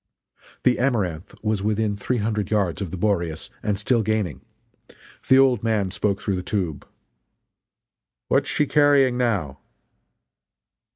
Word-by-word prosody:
The 125 - +3
Amaranth 105 -9 -1
was 105 -2 0
within 105 0 0
three 120 +5 -2
hundred 105 -2 -1
yards 100 -4 0
of 95 - -3
the 95 - -6
Boreas, 85 -5 -1
and 105 -2 -1
still 115 +3 +1
gaining. 110 -3 -1 0.9
The 130 -2 +6
"old 130 -5 +4
man" 110 -4 0
spoke 100 0 -1
through 100 -2 -2
the - - -3
tube: 90 -6 -3 1.4
"What - - +3
is - - -6
she 150 - +1
carrying 140 -3 +4
now?" 100 - -1
105 Hz, 135 wpm, -23 LUFS, 95-120 Hz, 1.4 s, The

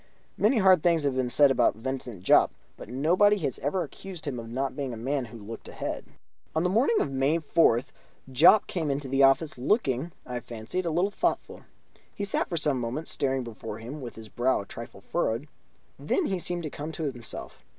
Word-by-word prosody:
Many 225 +5 +3
hard 190 -5 +6
things 165 -1 +3
have 140 -2 0
been 130 -1 0
said 140 +2 +5
of 120 -5 +3
Vincent 120 -4 -5
Jopp, - - +5 0.2
but - - -11
nobody 180 - +3
has 140 - -2
ever 175 +6 0
accused 175 +2 -9
him 135 -5 -3
of 115 -1 -8
not 135 +3 -2
being 135 -5 -3
a - - -9
man 135 +3 -1
who 115 0 -11
looked 110 +1 -9
ahead. - - -5 0.5
On 160 - +2
the 180 - +1
morning 260 - +3
of - - -1
May 135 +4 +2
4th 145 -5 +2 0.4
Jopp 170 +11 +7
came 160 -5 -2
into 140 0 -2
the 135 +1 +1
office, 135 +1 +4
looking, 140 - +1
I 125 -1 -4
fancied, 120 +11 -4
a - - +2
little 175 +5 +1
thoughtful. - - -2 0.5
He 205 - -4
sat 200 - -1
for 170 - -2
some 145 -4 +1
moments 125 +7 -3
staring 135 -2 0
before 115 -2 -7
him 125 +7 -8
with 120 -2 -7
his 110 -1 -9
brow 120 +4 +1
a - - -10
trifle - - -9
furrowed; 115 +7 -1 0.5
then 380 - 0
he 190 -7 -1
seemed 175 0 -3
to 155 - -4
come 150 +2 -5
to 160 - -4
himself. 125 -6 -5
140 Hz, 205 wpm, -27 LUFS, 125-170 Hz, 0.5 s, Jopp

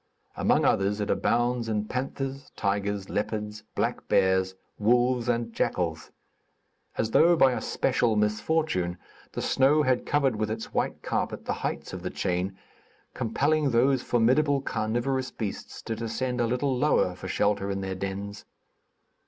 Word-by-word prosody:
Among - - +2
others 100 +2 +2
it 105 - -1
abounds 120 0 +1
in 105 -1 0
panthers, 135 +2 -4
tigers, 100 -1 -1
leopards, 105 0 -3
black - - -1
bears, 95 0 +2 0.2
wolves 120 +2 +2
and 115 -1 -1
jackals. 80 -6 -1 0.9
As 110 - 0
though 170 +7 +6
by 135 -5 +5
a 125 - -2
special 115 -3 +1
misfortune, 105 - 0 0.4
the - - -3
snow 145 +3 +4
had 130 -2 +1
covered 135 -6 +2
with 110 0 -1
its 110 +1 -5
white - - -1
carpet - - -2
the - - -1
heights - - -3
of 90 - -5
the 90 - -3
chain, 90 +2 -2 0.6
compelling 145 +6 +1
those 130 +2 +3
formidable, 135 +5 +3
carnivorous 130 +2 -1
beasts 105 -4 -6
to 115 - -3
descend 120 +2 -2
a 120 - +2
little 130 +3 0
lower 125 -9 +2
for 95 +1 -8
shelter 100 +1 +1
in 100 0 -2
their 95 0 -3
dens. 100 +2 -5
115 Hz, 145 wpm, -27 LUFS, 100-130 Hz, 0.9 s, though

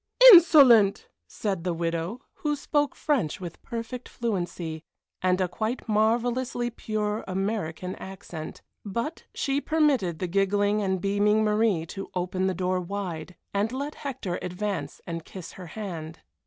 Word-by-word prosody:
"Insolent!" 275 - +7 0.2
said 195 -6 -3
the 175 -2 -1
widow, 170 +7 -2 0.2
who 295 -1 +1
spoke 290 0 0
French 260 - 0
with 175 -2 -8
perfect 235 +2 -6
fluency 175 -8 -3 0.4
and 185 0 +2
a 185 - +2
quite 220 +9 -3
marvellously 240 +3 +1
pure 215 -1 -2
American 185 -2 -2
accent. 185 -5 -8 0.2
But 235 - -4
she 275 +1 0
permitted 275 - +2
the 185 - -2
giggling 200 +3 +2
and 190 -2 0
beaming 205 +2 +2
Marie 210 -5 +2
to 195 +1 -6
open 185 +1 0
the 190 - -1
door 185 +1 0
wide, 180 -2 -5 0.2
and 205 +3 +1
let 280 +3 -3
Hector 255 -10 -4
advance 195 +3 -4
and 165 -2 -5
kiss 185 0 -9
her 180 -2 -10
hand. 165 -4 -6
200 Hz, 140 wpm, -27 LUFS, 180-235 Hz, 0.4 s, Insolent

